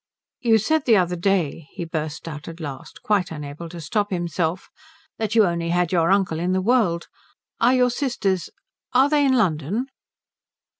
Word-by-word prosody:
"You 230 -2 +4
said 300 +8 +1
the 225 -4 +5
other 180 -1 +1
day," 170 -4 0
he 170 - -5
burst 160 0 -4
out 150 -2 -7
at 165 0 -8
last, 145 -5 -8
quite 200 -4 +1
unable 150 +1 -7
to 170 0 -8
stop 205 +7 -1
himself, 175 -1 -2 0.5
"that 220 -1 -1
you 220 -2 +6
only 170 -1 -1
had 175 -1 +1
your 170 -2 +2
uncle 190 -5 +2
in 180 +2 0
the 190 - +2
world. 190 -6 +2 0.5
Are 245 +3 +4
your 250 -1 +3
sisters 215 - -1 0.4
are 265 +3 +5
they 295 -1 +4
in 270 -2 +3
London?" 195 - +1
180 Hz, 170 wpm, -23 LUFS, 165-220 Hz, 0.5 s, you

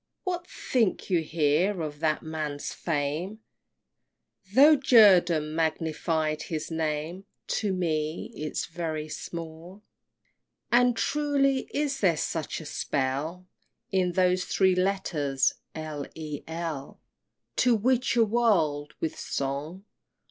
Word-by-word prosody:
What 355 -2 -3
think 225 -5 -1
you 175 -2 +3
here 160 +5 +1
of 150 -1 -6
that 155 -1 0
man's 155 -2 -4
fame? 165 +7 -2 1.1
Tho' 290 +7 +7
Jerdan 185 - +5
magnified 160 -1 -1
his 160 0 -4
name, 160 +3 -2 0.3
To 210 -3 0
me 160 -3 -2
'tis 155 0 -3
very 160 -2 -4
small! 170 +5 -8 0.9
XXII. 240 - +7
And, 245 -2 +2
truly, 280 -2 +1
is 285 -2 -1
there 175 -6 +3
such 160 0 -3
a 160 - -9
spell 145 +6 -2 0.5
In 185 -2 +1
those 185 0 +2
three 190 -1 +3
letters, 175 -8 +1 0.2
L. 155 -2 -5
E. 155 -2 -6
L., 160 -4 -5 0.6
To 250 -2 +4
witch 250 +4 +1
a 230 -1 +5
world 170 -11 +1
with 160 - -3
song? 145 +8 -4
165 Hz, 115 wpm, -27 LUFS, 155-200 Hz, 1.1 s, Tho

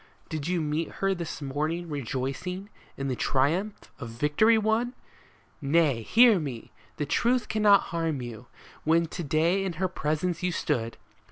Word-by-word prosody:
Did 155 -1 -4
you 180 -1 0
meet 155 +2 -2
her 195 0 0
this 170 -4 -5
morning 155 +5 -2
rejoicing 145 - -4 0.3
in 135 - -3
the 130 - -1
triumph 165 - 0
of 120 -5 -6
victory 150 - +3
won? 220 +3 0 0.7
Nay, 145 -4 +2
hear 225 - +6
me! 135 -7 -6 0.3
The 150 - -1
truth 240 - +1
cannot 210 -2 +5
harm 165 -4 -1
you. 120 -1 -8 0.4
When 165 +2 +3
to 170 +2 -6
day 165 +6 +2
in 190 -2 -2
her 185 +4 -1
presence 165 0 -2
you 180 0 0
stood. 120 -8 -2
165 Hz, 155 wpm, -27 LUFS, 140-190 Hz, 0.7 s, hear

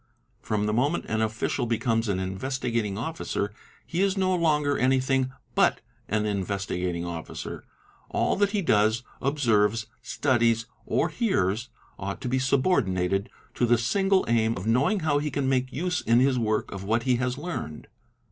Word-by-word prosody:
From 105 -1 -1
the 105 - 0
moment 140 +9 +1
an 110 0 0
official 110 +3 -1
becomes 115 -1 0
an 95 - +1
Investigat 115 +4 -2
ing 100 -1 -4
Officer, 115 -6 -3 0.3
he 170 +2 -2
is 195 0 +2
no 185 -1 +2
longer 150 -4 +2
anything 130 0 +2 0.2
but - - +3 0.3
an 105 +1 0
Investigating 95 -3 -2
Officer. 85 -2 -6 0.5
All - - +1
that 205 0 +3
he 200 -1 -1
does, 110 -3 +3 0.2
observes, 115 -6 +2 0.2
studies, 115 -4 +1 0.2
or 165 - +1
hears, 120 - 0 0.3
ought 100 +1 -4
to - - -3
be 130 +2 +1
subordinated 100 - +1 0.2
to 120 - +1
the 120 +1 +5
single 195 - +2
aim 115 -1 +2
of 90 - -5
knoWing 140 - +2
how 145 -2 +2
he 150 +1 -2
can 140 -1 -1
make 130 -1 +1
use 180 +6 -1
in 115 +1 +4
his 130 -1 +3
work 110 -2 0
of 100 -1 -6
what 115 +4 +1
he 125 -1 +2
has 125 0 -1
rned. 145 - -5
120 Hz, 165 wpm, -26 LUFS, 105-145 Hz, 0.5 s, the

